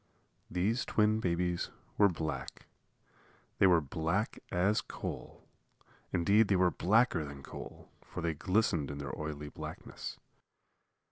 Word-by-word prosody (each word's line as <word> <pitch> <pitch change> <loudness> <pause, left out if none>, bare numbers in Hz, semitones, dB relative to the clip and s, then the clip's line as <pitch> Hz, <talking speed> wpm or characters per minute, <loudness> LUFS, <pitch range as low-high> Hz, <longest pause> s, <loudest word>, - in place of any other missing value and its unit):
These 100 +8 +1
twin 110 0 +3
babies 90 -2 0 0.3
were 100 -1 +6
black. 80 -3 -4 0.9
They 95 - +7
were 85 -3 +5
black 80 +8 -1
as 95 +4 +3
coal. - - -7 0.6
Indeed, 100 +5 +4
they 100 - +3
were 90 -1 +4
blacker 105 -3 +3
than 70 -1 -8
coal, - - -9 0.2
for - - -6
they 85 -1 0
glistened 90 -4 +1
in 70 - -5
their 70 -1 -4
oily 75 -1 -5
blackness. - - -7
90 Hz, 125 wpm, -33 LUFS, 80-105 Hz, 0.9 s, They